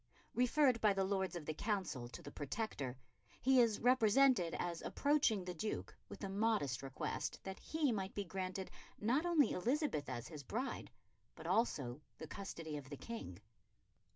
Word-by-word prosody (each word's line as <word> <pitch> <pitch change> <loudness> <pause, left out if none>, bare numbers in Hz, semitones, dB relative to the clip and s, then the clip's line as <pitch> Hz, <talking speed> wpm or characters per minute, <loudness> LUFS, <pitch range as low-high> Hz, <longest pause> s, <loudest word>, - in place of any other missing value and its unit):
Referred 250 +1 +4
by 210 -2 +5
the 195 0 +1
Lords 190 -1 0
of 170 -3 -5
the 155 - -2
Council 170 - -2
to 120 - -9
the 145 - -8
Protector, 145 - -3 0.4
he 260 -1 +6
is 225 -3 +3
represented 245 -5 +5
as 170 -1 -2
approaching 280 -10 +2
the 180 - -3
Duke 210 +6 -3
with - - -9
the 195 - -2
modest 195 - +1
request 135 -1 -3
that 190 0 -6
he 315 -4 +1
might 195 -3 -2
be 205 - -1
granted 190 0 -4 0.3
not 260 +10 +2
only 325 -5 +4
Elizabeth 245 - 0
as 120 - -4
his 155 -4 -7
bride, 240 - -3 0.5
but - - -10
also 140 - +1 0.2
the 160 - -6
custody 165 -4 -5
of 135 -2 -8
the 145 - -6
King. 225 - -6
195 Hz, 165 wpm, -38 LUFS, 155-235 Hz, 0.5 s, he